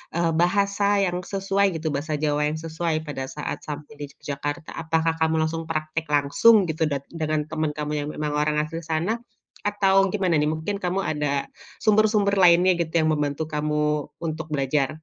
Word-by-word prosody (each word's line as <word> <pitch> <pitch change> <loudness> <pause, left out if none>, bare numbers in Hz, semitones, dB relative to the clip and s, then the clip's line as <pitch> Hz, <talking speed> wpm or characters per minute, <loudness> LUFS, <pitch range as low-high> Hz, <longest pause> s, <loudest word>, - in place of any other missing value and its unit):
eee, 170 -1 +2
bahasa 200 +2 +2 0.2
yang 180 0 -2
sesuai 195 +1 0
gitu 160 0 -4
bahasa 150 +2 -2
Jawa 150 0 +1
yang 155 - -3
sesuai 165 0 -1
pada 135 -2 -4
saat 150 - -5
sampai 150 0 -7
di 145 - -4
Yogyakarta, 145 +2 -5
apakah 160 0 0
kamu 160 0 +3
langsung 165 +1 -3
praktek 155 0 -2
langsung 145 +10 +5
gitu 160 +1 -1
dat 140 -1 -2
dengan 155 -2 -1
teman 155 -1 -1
kamu 150 0 -3
yang - - -6
memang 150 -1 -3
orang 150 0 +1
asli 165 +2 -5
sana, 170 +9 -1 0.4
atau 195 -1 +3
gimana 185 -5 +1
nih 150 - +2
mungkin 160 +6 -2
kamu 180 +2 0
ada 145 -2 -1 0.4
sumber-sumber 210 -2 +3
lainnya 180 +1 +6
gitu 165 -1 -2
yang 155 - +2
membantu 145 +1 -1
kamu 150 0 0 0.2
untuk 160 0 -4
belajar? 135 0 +1
160 Hz, 170 wpm, -24 LUFS, 150-180 Hz, 0.4 s, lainnya